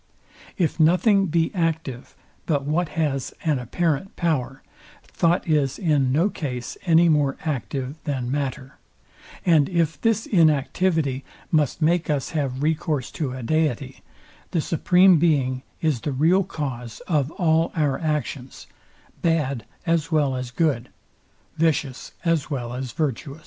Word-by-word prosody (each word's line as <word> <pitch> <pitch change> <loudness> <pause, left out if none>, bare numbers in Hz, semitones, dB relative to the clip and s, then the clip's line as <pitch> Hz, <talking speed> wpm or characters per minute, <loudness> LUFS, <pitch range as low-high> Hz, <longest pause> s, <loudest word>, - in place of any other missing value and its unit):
If 170 -2 0
nothing 195 +5 +4
be 165 0 +1
active 160 - -2 0.3
but 145 -4 +1
what 160 +3 0
has 140 -5 -1
an 150 -5 +1
apparent 160 - -1
power, 135 -6 -1 0.4
thought 175 +2 0
is 145 -4 +1
in 145 -8 +2
no 160 +8 +3
case 125 -11 -5
any 170 +1 +6
more 145 -4 +2
active 135 +1 -3
than 130 -5 -2
matter; 135 -2 -4 0.7
and 160 -5 +4
if 165 -5 0
this 225 -1 +1
inactivity 155 - +2 0.3
must 155 0 +1
make 170 +1 +2
us 145 -3 -1
have 140 -4 -2
recourse 155 -3 -1
to 140 -5 -3
a 130 -1 -6
deity, 140 -2 -1 0.5
the 170 - 0
supreme 180 +2 +4
being 135 -6 +2 0.2
is 150 -8 0
the 150 - -2
real 165 +8 +3
cause 125 - -5
of 150 -6 0
all 165 -1 +2
our 145 -5 +1
actions, 150 -4 -3 0.6
bad 145 -8 0 0.2
as 165 -2 0
well 145 -4 +2
as 125 -1 -4
good, 130 -2 0 0.7
vicious 150 -5 0
as 165 -3 +1
well 120 -5 -3
as 125 0 -4
virtuous. 145 -1 -3
150 Hz, 135 wpm, -23 LUFS, 135-165 Hz, 0.7 s, any